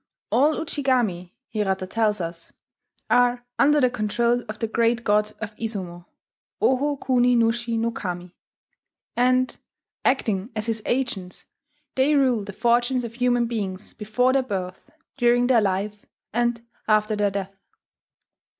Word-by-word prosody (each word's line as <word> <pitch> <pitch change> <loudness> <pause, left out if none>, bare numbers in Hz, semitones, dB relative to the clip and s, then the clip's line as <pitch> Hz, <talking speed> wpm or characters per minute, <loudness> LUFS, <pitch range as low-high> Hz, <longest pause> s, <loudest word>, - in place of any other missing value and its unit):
All 295 +4 +4
Ujigami, 245 - -1
Hirata 195 -3 -1
tells 210 +1 0
us, 170 -1 -6 0.6
are 245 0 +3
under 295 +1 +5
the 255 -3 +3
control 235 +1 0
of 215 - -5
the 225 - -1
Great 230 +1 +1
God 210 0 +2
of 215 -1 -6
Izumo, 185 -6 -5 0.5
Oho 285 +3 +2
kuni 250 -2 +2
nushi 235 0 +1
no 230 +1 0
Kami, 180 -4 -6 0.8
and, 255 +1 +2 0.5
"acting 215 -5 +1
as 215 -1 -2
his 225 -1 -1
agents, 220 -8 -2 0.5
they 275 +3 +3
rule 255 -6 +3
the 205 - -7
fortunes 240 +4 +1
of 235 -1 -6
human 245 0 +2
beings 205 -4 -4
before 250 +5 +1
their 270 - +3
birth, 190 -6 -5 0.3
during 245 -1 +3
their 245 -3 +4
life, 200 +1 -2 0.3
and 240 0 0 0.2
after 215 0 +2
their 205 -1 +2
death." 195 0 -5
230 Hz, 135 wpm, -24 LUFS, 205-245 Hz, 0.8 s, under